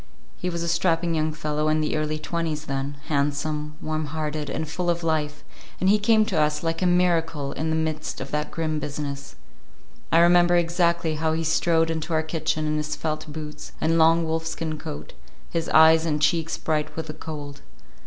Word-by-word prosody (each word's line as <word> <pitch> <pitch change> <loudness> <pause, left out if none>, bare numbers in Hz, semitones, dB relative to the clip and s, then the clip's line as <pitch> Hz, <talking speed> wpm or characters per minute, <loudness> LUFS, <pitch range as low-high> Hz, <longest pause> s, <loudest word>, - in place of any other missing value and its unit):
He 180 - -3
was 170 -1 -3
a - - -2
strapping 170 0 +1
young 155 -1 +1
fellow 150 -1 -2
in 155 0 +2
the 155 0 0
early 155 0 -1
twenties 155 0 -3
then, 135 +1 -3
handsome, 150 +1 -1
warm 155 0 -2
hearted, 150 -1 -3
and 160 - -3
full 175 +3 -2
of 170 0 0
life, 155 -2 -1 0.4
and 185 - +1
he 210 - +4
came 215 +1 +4
to 180 -8 +1
us 150 +1 0
like 165 +1 -1
a 185 - +3
miracle 165 -5 +1
in 160 +1 -2
the 160 - +1
midst 160 -1 -2
of - - -6
that 150 0 -1
grim 155 -2 -2
business. 140 - -5 0.8
I - - +5
remember 175 +1 +6
exactly 170 -2 +1
how 160 0 +1
he 165 +1 -1
strode 165 0 +2
into 160 +1 -3
our 155 - +2
kitchen 155 -1 -1
in 155 0 0
his 150 0 -2
felt 155 -1 -4
boots 150 0 -8
and 165 +1 +2
long 165 +1 +5
wolfskin 160 -1 -3
coat, 75 - -7 0.4
his 165 -1 -2
eyes 160 0 +7
and 155 -2 0
cheeks 160 +2 +1
bright 155 -1 -1
with 160 - -3
the 155 - -6
cold. 145 -2 -8
160 Hz, 195 wpm, -25 LUFS, 150-165 Hz, 0.8 s, eyes